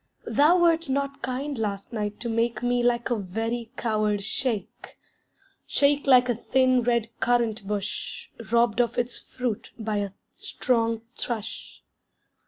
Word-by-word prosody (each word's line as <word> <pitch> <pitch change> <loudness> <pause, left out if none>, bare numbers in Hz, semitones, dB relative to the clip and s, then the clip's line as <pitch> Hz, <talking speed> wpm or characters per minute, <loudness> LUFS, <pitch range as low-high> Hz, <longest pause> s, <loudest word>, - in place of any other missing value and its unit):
Thou 305 +5 +4
wert 335 -3 +3
not 275 +1 -1
kind 260 +2 -3
last 200 0 -3
night 210 -2 -3
to 240 - -2
make 230 +1 0
Me 245 0 +2
like 240 0 +1
a - - +3
very 225 +4 -3
coward 215 -3 0
shake 220 -2 -3 0.7
Shake 285 0 +2
like 250 -2 +7
a 245 - +2
thin 255 +2 +2
red 235 -1 +1
currant 230 -4 +1
bush 205 -1 -4 0.2
Robbed 235 -1 +4
of 235 0 -1
its 245 0 -1
fruit 245 -4 -4
by 215 -2 -2
a 200 -1 -1 0.3
strong 230 -2 0
thrush. 225 -4 -5
235 Hz, 140 wpm, -26 LUFS, 220-255 Hz, 0.7 s, like